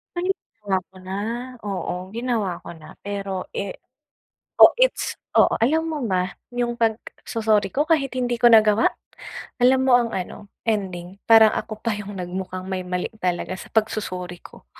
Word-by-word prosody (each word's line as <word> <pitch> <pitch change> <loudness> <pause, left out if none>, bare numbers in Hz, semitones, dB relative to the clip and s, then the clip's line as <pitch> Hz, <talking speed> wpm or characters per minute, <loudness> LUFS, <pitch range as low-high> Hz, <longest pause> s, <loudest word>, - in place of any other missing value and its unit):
Ay, 355 +2 -1
ginawa 205 - -2 0.2
ko - - -23
na, 185 +1 -6 0.5
oo. 195 -3 -3 0.2
Ginawa 225 -7 -2
ko - - -11
na 155 -1 -13
pero, 200 -2 -4
eh 195 - -4 0.8
oh, - - +9
it's - - +1 0.2
oo. - - +6
Alam 310 +8 +2
mo 315 -2 -3
ba, 185 -1 0 0.2
yung 240 -1 -1
pagso-sorry 220 -2 0
ko 290 - +3
kahit 300 -5 +1
hindi 245 -2 -1
ko 240 - +6
nagawa? 215 -1 +6 0.8
Alam 260 +1 +6
mo 250 - +5
ang 235 -2 +2
ano, 195 +2 -6 0.2
ending? 190 -3 -3
Parang 225 -1 +7
ako 215 -1 -4
pa 230 -2 -1
yung 205 -2 -7
nagmukhang 185 +1 -5
may 185 -1 -3
mali 180 0 -2 0.2
talaga 180 0 -1
sa - - -11
pag-sorry 185 -5 -2
ko. - - -15
210 Hz, 160 wpm, -23 LUFS, 185-240 Hz, 0.8 s, oh